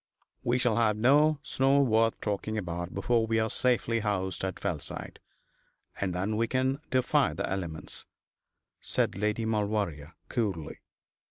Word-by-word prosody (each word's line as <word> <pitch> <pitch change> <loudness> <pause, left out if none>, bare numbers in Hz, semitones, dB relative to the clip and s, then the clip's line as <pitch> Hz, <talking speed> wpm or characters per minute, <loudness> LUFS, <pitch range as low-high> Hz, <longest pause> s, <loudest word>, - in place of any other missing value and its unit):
'We 120 +1 +2
shall 120 -3 +2
have 110 -3 +3
no 145 +7 +5
snow 135 -1 +3
worth 115 -2 +2
talking 110 +1 -2
about 85 -2 -4
before 115 -2 +1
we 115 0 +1
are 110 0 +1
safely 120 -2 +2
housed 95 -4 -2
at 95 -1 -3
Fellside, - - -4 0.8
and 95 -3 -1
then 100 +4 -1
we 115 +1 +2
can 130 +2 0
defy 130 -1 +2
the - - -2
elements,' 85 -5 -5 0.7
said - - 0
Lady 105 +3 -1
Maulevrier, 100 -8 -1
coolly. 100 - -2
110 Hz, 140 wpm, -29 LUFS, 95-120 Hz, 0.8 s, no